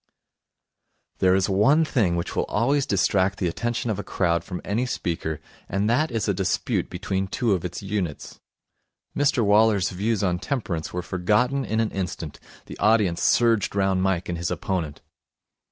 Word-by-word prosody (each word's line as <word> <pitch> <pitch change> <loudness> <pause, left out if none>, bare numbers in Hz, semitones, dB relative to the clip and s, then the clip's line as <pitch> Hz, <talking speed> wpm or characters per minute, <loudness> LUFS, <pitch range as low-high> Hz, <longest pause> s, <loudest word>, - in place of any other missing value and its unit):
There 95 0 +4
is 95 0 +2
one 110 +12 +4
thing 105 - +1
which 85 - -3
will - - +1
always 135 +6 +1
distract 95 0 +2
the 90 - 0
attention 115 +5 -2
of 105 - -3
a - - -3
crowd 85 -2 0
from 90 -2 -6
any 115 +5 -1
speaker, 80 -7 -3 0.3
and 100 +2 0
that 155 +7 +2
is 115 -3 -2
a 100 - +2
dispute 95 -1 -1
between 95 0 -2
two 110 +2 0
of 90 - -1
its 90 +2 -5
units. 95 -6 -4 0.8
Mr 135 -5 +2
Waller's 105 -2 +4
views 105 +3 -1
on 90 -2 +1
temperance 95 - -3
were 90 0 -3
forgotten 105 +11 +1
in 110 -3 -1
an 110 -1 0
instant. 90 -5 -5 0.3
The - - -10
audience 105 -5 +3
surged 115 -5 +3
round 95 -1 +2
Mike 95 -2 0
and 85 -1 -3
his 85 - -2
opponent. 85 -6 -3
100 Hz, 170 wpm, -24 LUFS, 90-115 Hz, 0.8 s, There